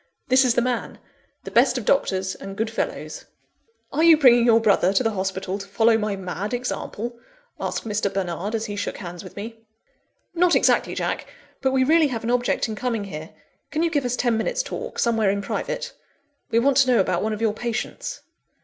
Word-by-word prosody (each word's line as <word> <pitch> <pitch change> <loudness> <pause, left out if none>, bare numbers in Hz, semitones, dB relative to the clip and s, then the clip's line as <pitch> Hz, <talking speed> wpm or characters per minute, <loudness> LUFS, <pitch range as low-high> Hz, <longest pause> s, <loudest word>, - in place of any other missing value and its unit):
This 260 +1 +6
is 250 -2 +2
the 240 - +3
man 245 -2 -2 0.5
the - - -8
best 250 +1 +4
of 240 - -4
doctors 190 -8 +1
and 195 0 -9
good 220 0 -1
fellows." 225 - -4 0.7
"Are 310 +3 +2
you 330 -2 +8
bringing 245 -4 +6
your 230 -1 +6
brother 200 -4 +3
to 255 - +2
the 225 - +1
hospital 190 -1 -3
to 195 - -8
follow 225 +3 +3
my 210 -2 -1
mad 195 +4 -4
example?" 240 -1 -4 0.4
asked - - -3
Mr. 210 -2 -1
Bernard, 195 +2 -3
as 225 0 -2
he 205 -2 -5
shook 205 - -3
hands 175 -2 -8
with - - -11
me. 225 +2 -7 0.7
"Not 350 0 +3
exactly, - - +2
Jack! - - -2 0.3
But 265 - +2
we 265 0 +2
really 315 +3 +4
have 235 -5 -4
an 235 - -1
object 245 0 +1
in 220 - -4
coming 230 -1 -2
here. 160 -5 -7 0.4
Can 315 +2 -1
you 335 - +1
give 290 -3 +1
us 245 0 -1
ten 240 -2 +1
minutes' - - -1
talk, - - -6
somewhere 225 -4 +2
in 200 +1 -1
private? - - -3 0.6
We 225 - +1
want 260 +3 +3
to 270 -2 +5
know 240 - +4
about 185 -2 +1
one 220 +1 -1
of 210 - -5
your 220 -2 +2
patients." 240 - -4
225 Hz, 205 wpm, -23 LUFS, 200-255 Hz, 0.7 s, you